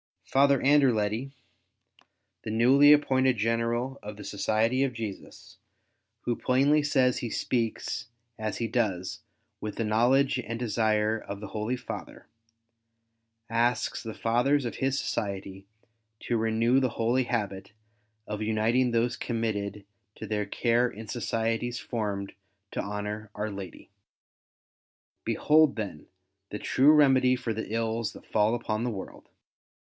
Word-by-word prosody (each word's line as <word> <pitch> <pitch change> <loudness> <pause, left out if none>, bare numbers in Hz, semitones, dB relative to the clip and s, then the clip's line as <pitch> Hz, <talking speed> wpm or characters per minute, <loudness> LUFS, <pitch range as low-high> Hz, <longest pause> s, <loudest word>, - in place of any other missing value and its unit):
Father 140 0 +4
Anderledy, 130 -3 +2 1.1
the - - -5
newly 130 +6 +6
appointed 130 -3 +3
General 115 +4 -1
of 105 0 -7
the 105 - -10
Society 110 +5 0
of 135 -2 -1
Jesus, 110 -4 -8 0.6
who 120 - -2
plainly 140 +4 +3
says 130 -4 +2
he 120 - -3
speaks 115 0 -2 0.3
as 110 -1 -3
he 115 - -1
does 100 -6 -1 0.4
with 105 -1 -5
the 115 - -1
knowledge 125 +5 +3
and 115 -2 -4
desire 110 -1 +1
of 100 -1 -7
the 105 - -7
Holy 110 +5 -2
Father, - - -8 1.2
asks 120 +2 0
the 110 -2 -6
Fathers 125 +7 +1
of 120 - -4
his 135 +1 0
Society 95 -4 -4 0.5
to 120 - -1
renew 115 +3 +2
the 130 -3 0
holy 120 +3 +1
habit 105 -5 -3 0.5
of 105 0 -5
uniting 110 +4 +2
those 120 +3 +1
committed 105 -5 -3 0.3
to - - -7
their 105 -1 -1
care 120 +4 +1
in 110 0 -10
societies 115 0 -1
formed 105 -5 -3 0.4
to - - -4
honour 105 +1 -5
Our 105 +1 -3
Lady. 100 -3 -9 1.3
Behold, 155 -1 +4
then, 100 -9 -6 0.4
the 105 - -4
true 140 +7 +4
remedy 130 -4 +5
for 125 -3 -3
the 110 0 -5
ills 115 0 -1
that - - -13
fall 110 +2 +2
upon 110 -2 -2
the - - 0
world. 95 -3 -8
115 Hz, 130 wpm, -28 LUFS, 105-125 Hz, 1.3 s, newly